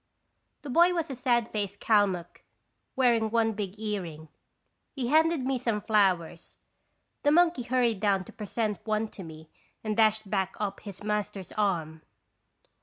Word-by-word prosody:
The 285 - -6
boy 345 +6 +5
was 330 -4 -2
a - - -4
sad 240 -2 +1
faced 200 -2 -3
Kalmuck, 195 -5 +1 0.5
wearing 235 -4 +3
one 225 0 +2
big 205 -1 -5
earring. 175 -8 -5 0.7
He 250 -4 -2
handed 320 +1 +3
me 265 -1 0
some 230 -4 -1
flowers. 185 -6 0 0.6
The 290 - +3
monkey 340 -3 +4
hurried 240 -3 +1
down 200 -2 +1
to - - -13
present 215 -1 -3
one 215 0 -1
to 200 - -11
me 160 -2 -11 0.3
and 215 -1 -2
dashed 215 -1 +3
back 190 -1 -1
up 200 -2 -3
his 200 -1 -10
master's 210 -2 -3
arm. 165 -7 -1
215 Hz, 150 wpm, -28 LUFS, 195-240 Hz, 0.7 s, boy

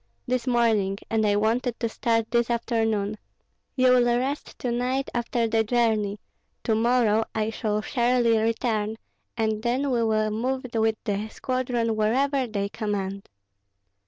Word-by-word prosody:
"This 255 0 -1
morning, 220 -5 +2
and 220 -1 +2
I 205 - +3
wanted 230 +3 0
to 230 - 0
start 225 0 0
this 235 0 +2
afternoon. 225 -3 0 0.6
You 255 -1 +4
will 240 -1 +4
rest 270 +4 -3
to 245 - -2
night 255 +3 -1
after 235 -1 0
the 225 0 +2
journey; 220 -3 +1 0.4
to 225 - +1
morrow 225 -1 +3
I 220 0 0
shall 215 -1 -1
surely 240 -2 +2
return, 220 -1 0 0.4
and 220 -1 0
then 255 +4 0
we 235 -2 +2
will 215 -1 +1
move 255 +4 -2
with 220 -1 +2
the 210 0 -2
squadron 245 -2 -1
wherever 260 +5 +1
they 200 -3 -2
command." 200 -2 -4
230 Hz, 145 wpm, -25 LUFS, 215-245 Hz, 0.6 s, You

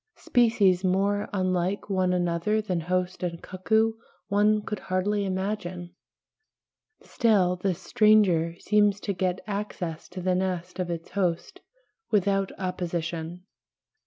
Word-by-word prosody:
Species 210 -7 +3
more 200 +2 +1
unlike 185 0 -1
one 185 -2 +1
another 175 +4 +1
than 185 -5 -2
host 180 +2 -2
and 170 -2 -3
cuckoo 220 +6 +1 0.4
one 210 +1 +3
could 210 -1 -4
hardly 200 +2 -1
imagine; 185 -2 -3 1.1
still 200 -7 +2
this 180 -1 -1
stranger 190 -6 +3
seems 205 0 +2
to 200 - -2
get 185 0 -1
access 200 -5 -5
to 185 - -7
the 185 0 0
nest 180 -1 -2
of 180 -1 -2
its 165 -1 -5
host 180 -4 -2 0.5
without 195 -2 +1
opposition. 175 -2 -4
185 Hz, 120 wpm, -26 LUFS, 180-205 Hz, 1.1 s, Species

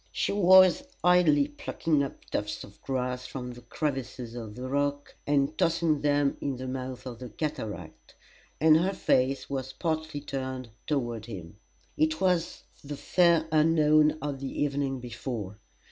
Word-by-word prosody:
She - - -1
was 185 +1 +6 0.2
idly 170 -5 +5
plucking 150 +1 -1
up 140 - -5
tufts 105 0 -3
of 100 - -15
grass 125 -1 -2
from 125 -2 -6
the 120 0 -11
crevices 125 -2 -4
of 115 -3 -7
the 125 +1 -5
rock, 145 +1 -1
and 145 +1 +2
tossing 165 -3 +2
them 145 -1 +2
in 140 -2 -2
the 130 +1 -6
mouth 130 0 -5
of 120 -3 -7
the 125 -1 -7
cataract, 105 - -6 0.4
and 155 +1 +6
her 185 +4 +1
face 135 -5 +1
was 130 -1 -4
partly 160 -3 -2
turned 130 -4 -5 0.2
toward 120 -6 -2
him. 95 -3 -9 0.4
It 155 0 +1
was 180 -3 0 0.2
the 145 0 -6
fair 170 -1 +3
unknown 155 -1 +4
of 145 -2 -3
the 135 +1 -2
evening 140 -2 -1
before! 115 -4 -6
140 Hz, 150 wpm, -28 LUFS, 125-155 Hz, 0.4 s, was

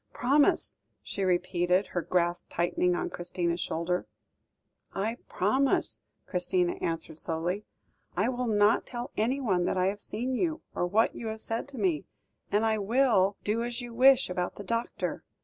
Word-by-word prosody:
"Promise," 280 +4 +2 0.3
she 195 - -3
repeated, 180 +1 +2
her 175 - 0
grasp 175 0 0
tightening 175 +1 +1
on - - -2
Christina's 175 -1 -2
shoulder. 170 +2 -1 0.9
"I 220 +4 -1
promise," 260 +9 +1 0.2
Christina 180 -1 +1
answered 165 -1 -3
slowly. 175 +5 -2 0.5
"I 200 +5 +3
will 250 -1 -2
not 210 0 +3
tell 240 0 -5
anyone 220 -6 +1
that - - 0
I 185 - +2
have 205 +1 -5
seen 245 +5 -3
you, 315 +4 -1
or 175 - 0
what 215 +5 +3
you 230 - -6
have 220 0 -4
said 225 +3 -3
to 280 -2 -10
me; 180 -8 0 0.5
and 210 +2 +3
I 220 -1 +2
will 210 -3 +3
do 220 +3 0
as 240 0 -3
you 240 -2 -6
wish 260 +2 +6
about 180 0 -2
the 205 - -7
doctor." 230 +3 -2
205 Hz, 160 wpm, -29 LUFS, 180-235 Hz, 0.9 s, wish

